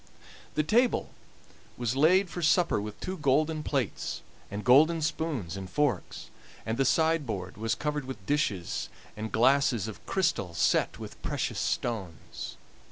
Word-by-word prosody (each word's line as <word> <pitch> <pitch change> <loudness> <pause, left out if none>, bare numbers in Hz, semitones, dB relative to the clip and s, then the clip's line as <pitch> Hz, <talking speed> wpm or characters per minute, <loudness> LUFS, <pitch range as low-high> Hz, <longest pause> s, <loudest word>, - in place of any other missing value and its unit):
The 155 - +2
table 235 - +2 0.7
was 120 0 -1
laid 180 +7 +5
for 175 +1 -6
supper 165 - +3
with 105 0 -7
two 185 +1 -4
golden 150 +2 +2
plates, 135 -7 -2 0.3
and 105 +1 -5
golden 155 +6 +5
spoons 145 - -2
and 95 -1 -6
forks, 130 -1 -1 0.3
and 110 +2 -2
the 135 - +3
sideboard 130 - +1
was 110 +2 -1
covered 150 +1 -2
with 115 -8 -8
dishes 100 - -1 0.3
and 110 +1 -5
glasses 125 -2 +3
of 110 - -8
crystal 170 - 0
set - - +2
with - - -9
precious - - -2
stones. 95 -9 -3
135 Hz, 140 wpm, -29 LUFS, 105-155 Hz, 0.7 s, laid